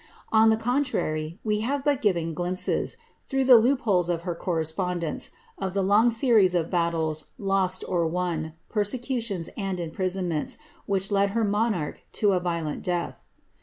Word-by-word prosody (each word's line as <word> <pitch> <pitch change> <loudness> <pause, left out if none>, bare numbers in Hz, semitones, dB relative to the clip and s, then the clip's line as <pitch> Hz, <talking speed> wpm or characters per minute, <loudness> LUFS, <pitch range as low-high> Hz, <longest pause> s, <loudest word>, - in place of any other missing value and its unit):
On 220 0 +6
the 220 - +3
contrary, 220 - -1
we 210 -1 0
have 270 +5 -1
but 285 -3 +2
given 170 -6 +1
glimpsei, 180 - 0 0.3
through 270 -1 0
the 255 -2 +9
loopholes 220 -8 +2
of 170 -1 -1
her 175 -1 -2
correspondence, 170 0 -2 0.3
of 190 0 -3
the 195 - +2
long 210 +5 +4
series 225 -6 +4
of 165 -2 0
battles, 165 -3 0
lost 195 -2 +1
or 170 -2 +1
won, 165 -2 -2
persecutions 225 -3 -2
and 195 -3 -3
imprisonments, 175 -1 -2 0.3
which 195 0 0
led 200 0 +3
her 230 - +2
monarch 205 -6 0
to 205 -2 +2
a 185 - +2
violent 170 -4 -3
death. 175 -1 -3
185 Hz, 150 wpm, -26 LUFS, 170-220 Hz, 0.3 s, the